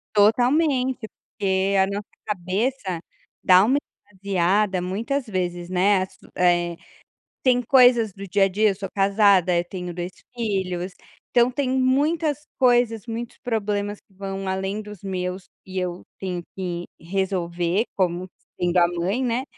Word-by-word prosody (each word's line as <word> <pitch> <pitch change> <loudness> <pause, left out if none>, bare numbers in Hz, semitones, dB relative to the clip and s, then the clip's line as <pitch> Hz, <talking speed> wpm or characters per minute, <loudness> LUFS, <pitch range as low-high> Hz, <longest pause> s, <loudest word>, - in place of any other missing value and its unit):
Totalmente, 255 +3 +3
porque 195 0 -1
a 190 - +4
nossa 200 +1 -4 0.2
cabeça 195 0 -2 0.4
dá 185 +1 +7
uma 265 +4 +3 0.3
esvaziada 190 0 +1
muitas 230 +10 -2
vezes, 175 -3 -3
né, 185 +1 +3
assu 185 - -12
eh, 175 -1 +2 0.7
tem 250 -1 +4
coisas 245 -4 +5
do 200 0 -8
dia 195 +1 +3
a - - +3
dia, 205 +1 +2
sou 195 0 -6
casada, 195 -2 +4
eu 170 - +1
tenho 180 -2 -5
2 175 +1 -4 0.2
filhos, 190 -5 -2 0.4
então 240 0 +4
tem 270 0 -1
muitas 290 +4 +1
coisas, 245 -4 +3
muitos 230 +1 -5
problemas 205 -3 -2
que 195 - -31
vão 195 0 -5
além 190 +2 -2
dos 210 -3 -10
meus 185 -1 -3 0.2
e 190 0 -5
eu 180 -1 -3
tenho 180 -2 -3
que 175 -2 -4
resolver 180 +1 -1
como 180 -1 0 0.3
sendo 175 0 +1
a 170 0 +5
mãe, 180 +8 -1
né, 250 +1 0
195 Hz, 140 wpm, -23 LUFS, 180-230 Hz, 0.7 s, dá